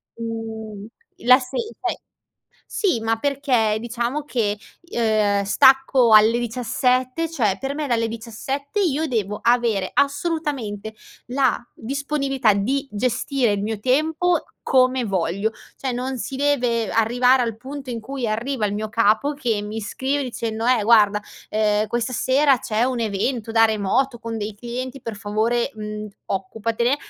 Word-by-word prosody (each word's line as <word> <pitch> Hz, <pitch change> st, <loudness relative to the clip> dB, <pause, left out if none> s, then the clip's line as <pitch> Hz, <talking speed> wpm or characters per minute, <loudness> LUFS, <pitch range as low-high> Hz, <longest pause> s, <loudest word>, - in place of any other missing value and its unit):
mhmm, 220 Hz, -2 st, -6 dB, 0.4 s
la 250 Hz, +1 st, +8 dB
se 255 Hz, -1 st, -6 dB, 0.2 s
cioè -, -, -1 dB, 0.7 s
sì 365 Hz, -, 0 dB
ma 225 Hz, 0 st, 0 dB
perché, 255 Hz, -5 st, +1 dB
diciamo, 240 Hz, +5 st, -3 dB
che 220 Hz, -7 st, -1 dB, 0.2 s
i 340 Hz, -, -11 dB
ehm, 215 Hz, -3 st, +2 dB
stacco 265 Hz, +2 st, +5 dB
alle 220 Hz, +2 st, +7 dB
17 255 Hz, +5 st, 0 dB
cioè, 220 Hz, -12 st, +1 dB
per 270 Hz, +1 st, -3 dB
me 300 Hz, 0 st, -2 dB
dalle 230 Hz, -3 st, +1 dB
17 235 Hz, -, -5 dB
io 320 Hz, -4 st, +1 dB
devo 210 Hz, -5 st, -2 dB
avere 235 Hz, -5 st, +2 dB
assolutamente 280 Hz, -, -1 dB, 0.3 s
la 260 Hz, -1 st, +2 dB, 0.2 s
disponibilità 275 Hz, -2 st, 0 dB
di 260 Hz, +8 st, 0 dB
gestire 240 Hz, +2 st, 0 dB
il 200 Hz, -1 st, -1 dB
mio 215 Hz, 0 st, -3 dB
tempo 315 Hz, +7 st, +1 dB, 0.2 s
come 255 Hz, -1 st, +3 dB
voglio. 195 Hz, +1 st, -1 dB, 0.2 s
Cioè, 265 Hz, -2 st, -3 dB
non 255 Hz, +2 st, -3 dB
si 265 Hz, -, -5 dB
deve 250 Hz, -6 st, +1 dB
arrivare 245 Hz, +3 st, +3 dB
al 230 Hz, -2 st, -2 dB
punto 270 Hz, +2 st, -7 dB
in 230 Hz, -1 st, -4 dB
cui 260 Hz, +2 st, -4 dB
arriva 230 Hz, +2 st, -1 dB
il 200 Hz, -, -3 dB
mio 215 Hz, +1 st, -3 dB
capo 230 Hz, +5 st, +2 dB
che 240 Hz, -7 st, -1 dB
mi 210 Hz, +2 st, -5 dB
scrive 265 Hz, +7 st, -2 dB
dicendo: 230 Hz, -3 st, -4 dB
"Eh 250 Hz, -3 st, +3 dB
guarda, 210 Hz, -2 st, +5 dB, 0.3 s
ehm, 210 Hz, 0 st, +2 dB
questa 240 Hz, +3 st, -2 dB
sera 270 Hz, +3 st, +3 dB
c'è 220 Hz, +1 st, 0 dB
un 255 Hz, -1 st, -1 dB
evento 225 Hz, +2 st, -2 dB
da 225 Hz, 0 st, +6 dB
remoto 225 Hz, +5 st, 0 dB
con 230 Hz, -1 st, -5 dB
dei 210 Hz, 0 st, -4 dB
clienti 245 Hz, +4 st, -6 dB
per 230 Hz, -2 st, -5 dB
favore, 225 Hz, +4 st, 0 dB
mhmm, 210 Hz, 0 st, -6 dB, 0.2 s
occupatene" 225 Hz, +6 st, -1 dB
235 Hz, 145 wpm, -22 LUFS, 215-265 Hz, 0.7 s, la